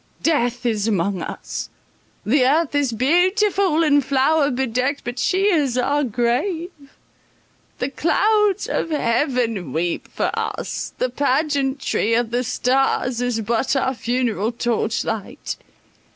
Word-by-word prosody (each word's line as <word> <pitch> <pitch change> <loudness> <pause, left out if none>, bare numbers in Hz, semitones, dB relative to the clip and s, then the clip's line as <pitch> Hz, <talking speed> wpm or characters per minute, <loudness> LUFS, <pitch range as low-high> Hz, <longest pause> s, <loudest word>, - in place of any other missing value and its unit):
Death 245 -6 +1
is 220 -3 0
among 195 -3 0
us! - - -6 0.6
The 255 +4 +3
earth 290 +4 +2
is 285 -3 +1
beautiful 355 - +2
and 290 -2 +4
flower 280 +3 +2
bedecked, 260 +2 -1
but 245 +1 -5
she 375 +1 +1
is 300 -11 +2
our 285 +4 +1
grave! 260 - -1 1.1
The 255 - -2
clouds 420 +7 +2
of - - -1
heaven 235 - 0
weep 170 +2 -2
for - - -2
us—the 255 - -3
pageantry 270 -3 0
of 235 -1 0
the 245 +1 0
stars 255 0 0
is 245 -2 -1
but 230 +5 0
our 265 -1 +1
funeral 235 -3 -1
torchlight. 230 -3 -2
255 Hz, 120 wpm, -21 LUFS, 235-295 Hz, 1.1 s, and